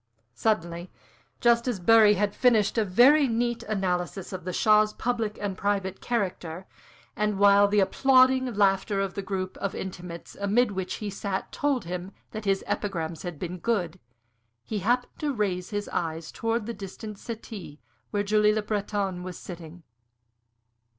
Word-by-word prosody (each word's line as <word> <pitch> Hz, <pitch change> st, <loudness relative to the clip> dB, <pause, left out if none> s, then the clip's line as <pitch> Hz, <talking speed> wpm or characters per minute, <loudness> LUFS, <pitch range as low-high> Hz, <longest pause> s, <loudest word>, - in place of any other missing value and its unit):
Suddenly 175 Hz, -, -1 dB, 0.5 s
just 235 Hz, 0 st, +4 dB
as 240 Hz, -6 st, -1 dB
Bury 215 Hz, +2 st, +6 dB
had 200 Hz, +1 st, 0 dB
finished 230 Hz, -5 st, +3 dB
a -, -, +3 dB
very 260 Hz, +9 st, +5 dB
neat 235 Hz, 0 st, 0 dB
analysis 190 Hz, -2 st, -2 dB
of 185 Hz, -2 st, -6 dB
the 185 Hz, -, -2 dB
Shah's 215 Hz, +2 st, +4 dB
public 230 Hz, -3 st, -2 dB
and 200 Hz, -2 st, -3 dB
private 195 Hz, -1 st, -1 dB
character, 185 Hz, -6 st, -3 dB, 0.5 s
and 210 Hz, -1 st, 0 dB
while 200 Hz, 0 st, +6 dB
the 205 Hz, 0 st, +3 dB
applauding 260 Hz, +4 st, +4 dB
laughter 195 Hz, 0 st, +2 dB
of 195 Hz, -1 st, -1 dB
the 200 Hz, -, -3 dB
group 190 Hz, -1 st, -4 dB
of 200 Hz, -, -3 dB
intimates 175 Hz, -2 st, -7 dB
amid 210 Hz, +3 st, +2 dB
which 190 Hz, -2 st, -3 dB
he 210 Hz, -2 st, -5 dB
sat 195 Hz, 0 st, -4 dB
told 280 Hz, -, 0 dB
him 180 Hz, +2 st, -5 dB, 0.2 s
that 215 Hz, -1 st, -6 dB
his 195 Hz, -1 st, +1 dB
epigrams 175 Hz, -6 st, -3 dB
had 175 Hz, -3 st, -6 dB
been 180 Hz, +3 st, -5 dB
good 185 Hz, -4 st, -1 dB, 0.6 s
he 215 Hz, -, -3 dB
happened 245 Hz, +5 st, 0 dB
to 300 Hz, -1 st, 0 dB
raise 190 Hz, -5 st, -1 dB
his 205 Hz, -1 st, -3 dB
eyes 165 Hz, -1 st, -3 dB
towards 230 Hz, -1 st, -1 dB
the 235 Hz, -, -4 dB
distant 200 Hz, +1 st, -8 dB
settee 215 Hz, -9 st, -8 dB, 0.3 s
where 205 Hz, -1 st, 0 dB
Julie 210 Hz, +1 st, +3 dB
Le 215 Hz, -, 0 dB
Breton 205 Hz, -3 st, -2 dB
was 180 Hz, -1 st, -7 dB
sitting. 170 Hz, -1 st, -10 dB
200 Hz, 155 wpm, -27 LUFS, 185-220 Hz, 0.6 s, Bury